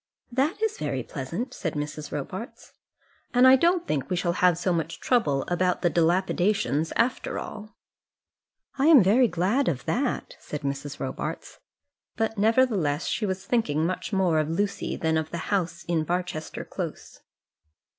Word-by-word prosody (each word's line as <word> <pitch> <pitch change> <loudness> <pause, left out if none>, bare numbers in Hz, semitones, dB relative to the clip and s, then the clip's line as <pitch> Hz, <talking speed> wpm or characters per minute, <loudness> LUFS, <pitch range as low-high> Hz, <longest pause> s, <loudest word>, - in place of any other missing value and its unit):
"That 275 +10 0
is 440 - 0
very 135 -4 -2
pleasant," 170 - -5
said 165 - -3
Mrs. 150 0 -5
Robarts. 185 - -6 0.6
"And 250 +1 +6
I 260 0 +9
don't 345 +5 +2
think 140 -3 -1
we 180 - 0
shall 175 0 0
have 180 -2 +5
so 180 +1 0
much 165 -1 -2
trouble 145 - +1
about 180 +1 0
the 175 - +3
dilapidations 170 - +1
after 235 +2 0
all." 215 +1 -8 1.0
"I 280 - +4
am 300 -9 +8
very 235 +7 +5
glad 200 +9 +1
of 135 -6 -1
that," 255 0 -2
said 150 - -6
Mrs. 140 +1 -4
Robarts. - - -5 0.6
But 225 0 -1
nevertheless 210 - +2
she 215 - -1
was 190 0 -3
thinking 160 -11 +1
much 185 +5 -3
more 185 -5 +2
of 155 0 -1
Lucy 200 +5 -1
than 160 -1 0
of 160 - -4
the 170 - -5
house 180 -2 -1
in 170 -2 0
Barchester 175 -1 -3
Close. - - -6
180 Hz, 155 wpm, -26 LUFS, 155-225 Hz, 1.0 s, I